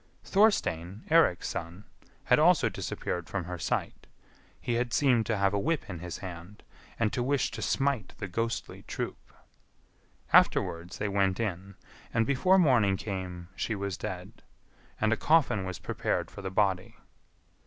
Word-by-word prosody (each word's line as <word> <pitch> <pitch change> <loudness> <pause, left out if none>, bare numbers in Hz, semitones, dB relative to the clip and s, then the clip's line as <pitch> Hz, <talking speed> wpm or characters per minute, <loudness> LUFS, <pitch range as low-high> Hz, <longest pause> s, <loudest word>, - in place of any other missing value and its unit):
Thorstein, 110 - +1
Eirik's 160 - +4
son, 85 +4 -5 0.4
had - - +4
also - - +5
disappeared 90 -1 -4
from 100 -2 -2
her 90 0 -6
sight; - - -3 0.5
he 120 - -2
had 120 0 -1
seemed 125 -6 +3
to 110 - 0
have 100 0 +2
a 100 - +1
whip 160 +7 -1
in 90 -4 -6
his 90 0 -6
hand, 90 +2 -9 0.3
and 110 -2 0
to 125 - 0
wish 140 +2 +1
to - - -6
smite 135 -4 0
the 100 - -4
ghostly 115 +5 -3
troop. - - -5 1.0
Afterwards 85 +3 +3
they 105 - -1
went 95 -1 +1
in, 100 -3 -3 0.4
and 115 -1 +2
before 180 +9 +3
morning 120 - +4
came 90 -3 -5
she 110 - -2
was 100 -1 -3
dead, 95 +3 -7 0.6
and 110 +1 +2
a - - 0
coffin 140 -12 +3
was 95 -2 -4
prepared - - -2
for - - -9
the 95 - -4
body. 95 -1 0
100 Hz, 155 wpm, -29 LUFS, 90-120 Hz, 1.0 s, also